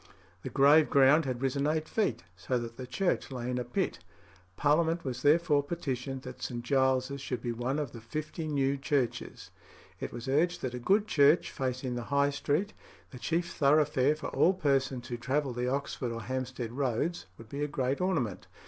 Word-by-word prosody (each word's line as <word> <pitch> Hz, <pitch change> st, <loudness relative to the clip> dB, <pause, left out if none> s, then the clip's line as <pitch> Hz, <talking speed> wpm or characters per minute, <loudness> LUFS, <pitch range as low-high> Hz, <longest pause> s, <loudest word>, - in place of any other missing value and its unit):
The -, -, -5 dB
grave 145 Hz, +3 st, +5 dB
ground 140 Hz, +2 st, +5 dB
had 130 Hz, -1 st, -3 dB
risen 140 Hz, +2 st, +1 dB
eight 155 Hz, +1 st, 0 dB
feet, 160 Hz, -, -1 dB
so 125 Hz, +6 st, -2 dB
that 115 Hz, -1 st, -5 dB
the 125 Hz, 0 st, -7 dB
church 190 Hz, +7 st, 0 dB
lay 125 Hz, -2 st, -4 dB
in 125 Hz, -, -1 dB
a -, -, -1 dB
pit. 120 Hz, +1 st, -2 dB, 0.6 s
Parliament 165 Hz, +3 st, +2 dB
was 125 Hz, -2 st, -3 dB
therefore 150 Hz, 0 st, +4 dB
petitioned 135 Hz, -4 st, -4 dB
that -, -, -9 dB
St. 120 Hz, -2 st, -4 dB
Giles's 130 Hz, +1 st, +1 dB
should 125 Hz, -2 st, -3 dB
be 120 Hz, -, -1 dB
one 120 Hz, +4 st, -2 dB
of 145 Hz, -5 st, -2 dB
the 115 Hz, -, -10 dB
fifty 155 Hz, +6 st, -5 dB
new 140 Hz, -2 st, +1 dB
churches. 135 Hz, -4 st, -2 dB, 0.5 s
It -, -, -4 dB
was 120 Hz, +2 st, -7 dB
urged 160 Hz, +6 st, +1 dB
that 130 Hz, -2 st, -2 dB
a 125 Hz, -, -4 dB
good 200 Hz, -, +3 dB
church 150 Hz, -3 st, +4 dB
facing 130 Hz, -1 st, -3 dB
the 120 Hz, -1 st, -4 dB
High 140 Hz, 0 st, +2 dB
Street, 155 Hz, +8 st, -1 dB, 0.4 s
the 125 Hz, -, -9 dB
chief 170 Hz, +7 st, -1 dB
thoroughfare 145 Hz, -1 st, +3 dB
for 155 Hz, -, -5 dB
all 180 Hz, -, +3 dB
persons 135 Hz, -5 st, 0 dB
who 120 Hz, -, -4 dB
travelled 130 Hz, +1 st, -1 dB
the 125 Hz, +1 st, 0 dB
Oxford 130 Hz, -2 st, -2 dB
or 115 Hz, -1 st, -5 dB
Hampstead 130 Hz, -2 st, -4 dB
roads, 135 Hz, +6 st, -1 dB
would 115 Hz, -1 st, -13 dB
be 140 Hz, +3 st, -3 dB
a -, -, 0 dB
great 135 Hz, 0 st, -1 dB
ornament. 155 Hz, -, -1 dB
135 Hz, 190 wpm, -30 LUFS, 125-150 Hz, 0.6 s, grave